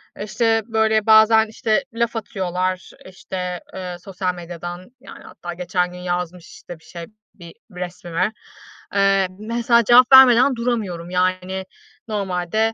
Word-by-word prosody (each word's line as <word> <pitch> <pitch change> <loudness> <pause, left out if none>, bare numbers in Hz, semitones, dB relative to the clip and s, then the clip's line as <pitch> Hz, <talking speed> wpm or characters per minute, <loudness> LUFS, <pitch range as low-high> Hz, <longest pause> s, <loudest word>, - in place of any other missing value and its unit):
E, 205 - -6
işte, 225 +1 +1
böyle, 220 -2 +1
bazen, 220 0 +6
işte, 220 +3 -1
laf 235 0 -1
atıyorlar, 185 -3 -3
işte, 180 -1 -6
eee, 180 -1 -6
sosyal 185 0 -4
medyadan. 175 +2 -8
Yani, 270 - -13
hatta 175 0 -9
geçen 180 0 -2
gün 180 - -10
yazmış, 180 -1 -4
işte, 175 -2 -12
bir - - -26
şey, 170 0 -9 0.3
bir 170 -3 -13 0.2
resmime. 180 +2 -3 0.6
Eee, 195 -1 +3
mesela 235 +2 +1
cevap 245 +3 +6
vermeden 260 0 +7
duramıyorum 210 -8 -3
yani 185 +1 -1 0.4
normalde. 205 +2 -1
190 Hz, 130 wpm, -20 LUFS, 180-220 Hz, 0.6 s, vermeden